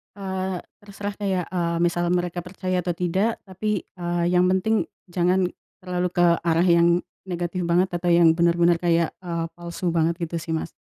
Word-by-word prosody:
Eee, 190 -2 -3 0.2
terserah 205 0 -6
kayak, 190 -4 -1
eee, 170 -2 -1
misal 175 0 +1
mereka 175 -1 -1
percaya 185 -1 -2
atau 180 - -1
tidak 185 +6 0
tapi, 205 +2 -2
eee, 175 -1 -1
yang 180 0 +3
penting 210 +4 +2 0.2
jangan 180 +1 +2 0.3
terlalu 180 -1 -2
ke 175 -1 +3 0.2
arah 170 +1 +2
yang 170 0 +5 0.2
negatif 180 -1 -3
banget 175 +2 +3
atau 175 0 0
yang 170 -1 +6
bener-bener 170 0 +3
kayak, 170 -1 +1
eee, 170 -1 -2
palsu 175 +1 -5
banget 165 +1 +1
gitu 170 0 -3
sih, 165 0 -4
Mas. 160 - -2
175 Hz, 165 wpm, -24 LUFS, 170-185 Hz, 0.3 s, yang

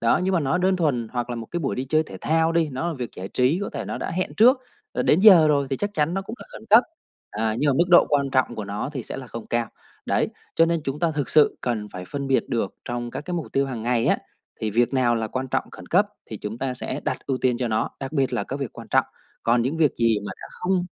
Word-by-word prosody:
đó, 115 +8 +3
nhưng 190 0 +1
mà 170 - +3
nó 140 +4 +1
đơn 185 +1 +2
thuần, 130 -10 0
hoặc 120 0 -2
là 120 - -3
một 115 -1 -6
cái 175 - -4
buổi 135 - -1
đi 130 - -2
chơi 155 +2 +3
thể 95 -11 -10
thao 160 +1 +2
đi, 165 -2 +2
nó 145 +7 -2
là 170 - -3
việc 125 -3 -5
giải 95 +1 -6
trí, 130 - +2
có - - -3
thể - - -5
nó - - -4
đã - - -4
hẹn 185 +2 -2
trước, 255 +4 +5 0.3
rồi - - 0
đến 160 - +4
giờ 180 -7 +8
rồi 140 -2 +2
thì 135 - 0
chắc 205 +6 -2
chắn 155 +2 +1
nó 195 - -1
cũng 225 - -7
là - - -10
khẩn - - -10
cấp, 225 +4 +9 0.5
à, 110 +1 -1
nhưng 145 - +2
mà - - +4
mức 170 +5 +2
độ 175 -1 +7
quan 140 -2 +1
trọng 130 -2 +1
của 110 - -5
nó 100 +6 -4
thì 130 - -4
sẽ - - -6
là 130 - -7
không 115 -2 -8
cao. 120 0 0 0.4
Đấy, - - +1 0.3
cho 165 - +5
nên 170 -1 0
chúng 135 +2 -3
ta 170 -2 +1
thực 145 -2 -2
sự 150 -1 +4
cần 110 -4 -2
phải 90 -2 -8
phân 140 +8 -4
biệt 135 -1 +2
được 115 -5 -1
trong 120 0 -4
các - - -5
cái 180 - -4
mục 165 - -3
tiêu 135 0 +2
hàng 120 -5 -5
ngày 120 -1 +1
á - - +3 0.4
thì 110 -1 -1
việc 120 +5 +2
nào 125 -2 +3
là 115 -1 -1
quan 130 +3 -3
trọng 130 0 0
khẩn - - -11
cấp 200 +4 +3 0.2
thì 110 - -6
chúng 105 +3 -6
ta 130 -1 -2
sẽ 130 +2 -4
đặt - - -3
ưu 130 -2 -1
tiên 125 -2 +1
cho 125 -2 -1
nó, 110 - 0
đặc 135 +2 -5
biệt 135 -3 +1
là - - -1
các 135 - -5
việc 130 - -4
quan - - -11
trọng. - - +3 0.4
Còn 120 0 +3
những 135 +6 -1
việc 155 -3 +4
gì 115 -2 +3
mà - - -4
đã - - -9
không 180 0 -1
135 Hz, 295 wpm, -24 LUFS, 120-165 Hz, 0.5 s, cấp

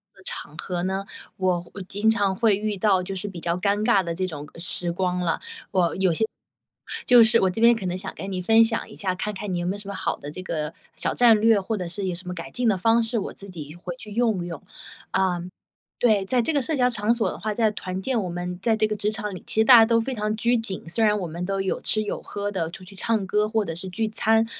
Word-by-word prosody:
的 190 - -18
场 150 - -7
合 175 0 -3
呢， 190 +1 -2 0.3
我 180 -2 0
我 200 - -7
经 205 +4 0
常 205 -4 +2
会 220 -1 +3
遇 210 0 -2
到 190 -1 +3
就 195 +1 -5
是 190 +2 -4
比 180 -4 -7
较 170 +1 0
尴 200 +2 +1
尬 200 -2 +4
的 170 -1 -3
这 185 +2 -1
种， 150 -5 -6
呃， - - -12
时 170 +1 -2
光 180 +1 -1
了。 170 -2 -1 0.3
我 175 -3 +2
有 190 -3 +2
些 220 - +1 0.8
就 245 -1 +8
是 225 +1 +4
我 190 - +3
这 185 - -4
边 235 0 +7
可 225 - -5
能 180 0 -1
想 190 - -5
跟 195 - -6
你 185 -1 -2
分 225 +5 +6
享 225 0 -1
一 - - -11
下， 190 -2 -1
看 210 +3 -3
看 200 -1 -4
你 175 - -1
有 175 - -2
没 185 - 0
有 205 - -6
什 205 -1 -9
么 200 - -4
好 - - -1
的 145 - -8
这 185 - -7
个 155 -4 -3 0.2
小 - - -1
战 230 -3 +6
略， 225 -2 +5
或 220 +4 -2
者 180 - -4
是 195 +3 -3
有 180 - -2
什 180 +1 -9
么 - - -3
改 170 -2 -7
进 245 -1 0
的 195 - +2
方 230 +4 +3
式， 225 0 -1
我 - - -5
自 200 - -9
己 155 -4 -8
回 175 0 -6
去 210 +3 -10
用 220 -5 +1
用。 165 -4 -6 0.5
呃 180 -2 +1 0.6
对， 215 -5 +3
在 245 +5 +2
这 235 - 0
个 290 -2 +2
社 310 +5 -1
交 250 -2 +3
场 225 -1 +1
所 235 - +1
的 - - -8
话， 215 0 -2
在 220 0 +2
团 185 -2 -5
建 245 +1 0
我 185 - -3
们 175 +1 -4
在 225 +2 +2
这 215 0 +2
个 215 - -2
职 210 +1 0
场 210 -2 -4
里， 185 - -7
其 220 - +2
实 - - +3
大 245 0 +10
家 225 - +8
都 230 0 +3
非 260 +3 -2
常 215 -1 -1
拘 235 +2 +2
谨， 195 -7 -5
虽 225 +7 +3
然 210 0 +3
我 190 - -3
们 170 +3 -5
都 195 0 -1
有 190 - -1
吃 215 - +1
有 205 - -4
喝 205 0 -4
的， 170 -5 -2
出 185 - -9
去 190 +2 -12
唱 210 +1 0
歌 210 +3 +1
或 220 0 +1
者 165 - -4
是 175 +4 -7
聚 220 +4 -1
餐， 225 +1 +2
200 Hz, 305 characters per minute, -24 LUFS, 180-220 Hz, 0.8 s, 大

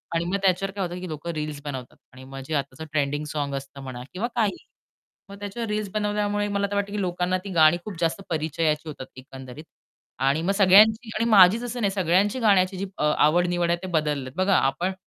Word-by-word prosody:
आणि 165 - 0
मग 180 +3 -1
त्याच्यावर 195 +1 +1
काय 200 - -2
होतं, 175 +1 -7
की 185 - -6
लोक 155 +2 -7
रील्स 150 -3 -4
बनवतात. 130 -4 -7 0.2
आणि 130 +1 -13
मग 135 +1 -9
जे 160 - -5
आताच 140 +2 -4
ट्रेंडिंग 145 0 -1
सॉन्ग्स 145 -2 -3
असतं 140 0 -10
म्हणा 125 -2 -7
किंवा 200 +6 -2
काहीही 215 -4 -1 0.6
मग 200 0 -11
त्याच्यावर 205 +3 -5
रील्स 210 -1 -2
बनवल्यामुळे 205 0 -1
मला 200 0 -1
तर - - -2
वाटतं, 200 0 -1
की 205 0 -2
लोकांना 180 0 -1
ती - - -5
गाणी 155 0 +5
खूप 205 -5 -7
जास्त 170 +4 -1
परिचयाची 155 0 -1
होतात 140 -3 -8
एकंदरीत. 130 +1 -10 0.6
आणि 135 +4 +1
मग 180 +4 0
सगळ्यांची 215 +4 +5
आणि 230 - +1
माझीच 205 +2 +6
असं 245 0 -4
नाही 200 - +1
सगळ्यांची 190 +5 +1
गाण्याची 195 -3 +2
अ, - - -2
आवड-निवड 175 +2 +2
आहे 175 - +1
ते 185 - -4
बदललेत. 150 -5 -1
बघा 190 +1 +2
आपण, 175 +8 0
180 Hz, 205 wpm, -24 LUFS, 150-200 Hz, 0.6 s, माझीच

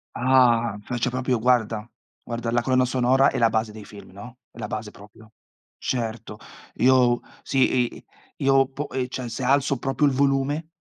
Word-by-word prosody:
Ah, 120 -4 +3
faccio 120 +3 -2
proprio, 125 0 -1
guarda, 115 -2 +1 0.4
guarda, 120 0 -4
la 120 0 +2
colonna 130 0 +2
sonora 130 +2 +3
è - - -4
la 115 -2 +3
base 110 -1 -1
dei 105 -1 -11
film, 105 -2 -13
no, 115 +6 -12
è - - -19
la 110 -3 -5
base 110 -1 -5
proprio. 105 +2 -17 0.5
Certo, 115 -3 -4 0.4
io 125 -1 +3 0.2
sì, 130 -2 +1
i - - -13 0.3
io, 135 -1 +3
po 140 +2 -5
eh, 130 -1 -2
cioè, 130 -1 -5
se 120 +3 -5
alzo 140 +1 +2
proprio 135 +3 +1
il 140 - +1
volume 140 +3 0
125 Hz, 170 wpm, -24 LUFS, 115-130 Hz, 0.5 s, Ah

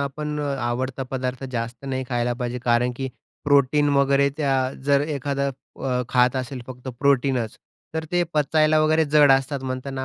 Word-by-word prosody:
आपण 150 +2 -3
अ, - - -2 0.2
आवडता 130 +2 -2
पदार्थ 130 0 -3
जास्त 115 +2 -4
नाही 130 -1 -2
खायला 120 -1 0
पाहिजे 125 0 -2
कारण 120 +1 +2
की 135 0 -3 0.4
प्रोटीन 145 +1 +3
वगैरे 140 0 +4
त्या 145 -3 +1 0.3
जर 140 0 +4 0.2
एखादा 140 0 -1
अ, 130 -1 -4
खात 125 +1 +3
असेल 130 0 -4
फक्त 125 0 -8
प्रोटीनच 135 -4 +1 0.4
तर 160 0 -2
ते 175 0 +3
पचायला 155 +1 +3
वगैरे 155 +1 +3
जड 145 -1 +5
असतात 135 +1 +1
म्हणतात 130 +1 -4
ना 130 0 -3
135 Hz, 165 wpm, -23 LUFS, 125-145 Hz, 0.4 s, जड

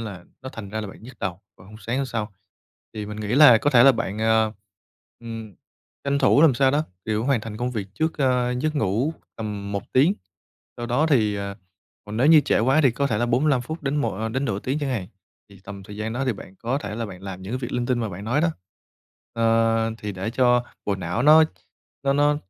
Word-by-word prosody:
là 100 -6 -7 0.2
nó 130 - -6
thành 105 -3 -8
ra 110 +1 -3
là 105 - -5
bạn 95 - -12
nhức 125 +4 -12
đầu 95 -2 -4 0.2
vào 90 - -17
hôm 105 +2 -12
sáng 115 +2 -3
hôm 135 0 -1
sau. 110 -4 -4 0.6
Thì 105 -1 -5
mình 105 +1 -6
nghĩ 105 - -4
là 135 -5 +8
có 145 - +1
thể 120 -4 +6
là 135 - +8
bạn, 110 -4 -3
ờ, 110 0 +2 0.7
ừm, 115 -3 -8 0.5
tranh 140 0 +1
thủ 145 - +4
làm 155 -6 +6
sao 135 +1 +3
đó, 150 +3 +1 0.2
kiểu, 110 +1 -1
hoàn 135 -3 +2
thành 105 0 -7
công 120 +2 -2
việc 105 -5 -4
trước, 160 +7 -1
a, 125 -3 +2
giấc 150 +5 -1
ngủ 130 +6 0 0.2
tầm 105 -2 -5
1 100 - -2
tiếng, 150 +10 +4 0.6
sau 120 - -5
đó 125 +6 +2
thì, 110 -9 +2
à, 100 0 -5 0.5
còn 105 +1 -6
nếu 125 +5 +3
như 155 0 +8
trễ - - +1
quá 130 +7 +3
thì 135 - +5
có 140 +4 -1
thể 110 -6 -1
là 120 - +1
45 130 +3 +2
phút 160 +6 -7
đến 140 0 -1
mộ 115 -9 0
ơ, 110 +2 -2
đến 130 +5 -2
nửa 105 -7 -1
tiếng 135 +6 -2
chẳng 145 -3 -2
hạn, 105 -8 -3 0.4
thì 100 -1 -16
tầm 100 -1 -8
thời 105 +2 -10
gian 110 +1 -3
đó 130 +3 -2
thì 130 - +1
bạn 95 -2 -12
có 125 +4 -1
thể 105 -6 -6
là 115 +1 -3
bạn 95 -2 -11
làm 95 -1 -7
những 95 +4 -6
cái 130 - -1
việc 125 -1 -5
linh 125 -1 -1
tinh 125 -1 +1
mà 115 - -2
bạn 100 +1 -8
nói 125 +7 +1
đó, 170 - +3 0.8
ờ, 115 0 +2
thì 105 -2 -5
để 95 +3 -4
cho 125 0 +3 0.2
bộ 100 - 0
não 90 +5 -2
nó 155 +3 +8 0.6
nó 135 - +3
nó 145 +1 +3
115 Hz, 250 wpm, -24 LUFS, 105-135 Hz, 0.8 s, là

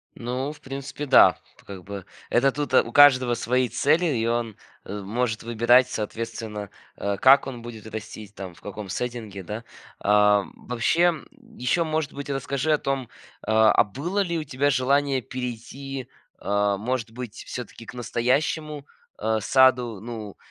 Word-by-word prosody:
Ну, 125 +4 -3
в 150 - -13
принципе, 135 +2 -6
да. - - +7 0.2
Тут - - -22
как 95 -2 -9
бы 100 -1 -7 0.2
это 135 +3 +3
тут, 145 +1 -4
а, - - +6
у 115 - -9
каждого 130 -3 +6
свои 125 +2 +1
цели, 145 - +2
и 120 -8 0
он, 115 -2 -1 0.3
э, 105 +2 -5
может 110 +2 -2
выбирать, 120 +2 +4
соответственно, 105 -2 -5 0.3
э, 100 0 -2
как 135 +6 +6
он 125 -3 -6
будет 110 -2 -9
растить, 110 -1 -8
там 95 -2 -7
в - - -20
каком 105 -1 -7
сеттинге, 110 -4 -4
да. 105 +6 -6 0.4
А, 105 0 +4
м, - - -12
вообще, 125 +7 +1
м, 175 -3 +2 0.3
ещё, 170 +7 +1
может 155 -2 -2
быть, 140 0 -7
расскажи 140 +2 -1
о - - +4
том, 135 -4 -3 0.3
а, 110 0 +4
а - - +5
было 150 - -3
ли 170 -4 0
у 155 - -2
тебя 140 0 0
желание 140 0 +2
перейти, 130 +2 -6 0.3
а, 100 0 0
может 115 +2 -3
быть, 120 -2 -7
всё-таки 120 -1 -8
к - - -9
настоящему, 140 +5 -1 0.3
а, 110 +1 0
саду. 125 -2 +3
Ну, 110 -2 -7
120 Hz, 165 wpm, -25 LUFS, 110-135 Hz, 0.4 s, да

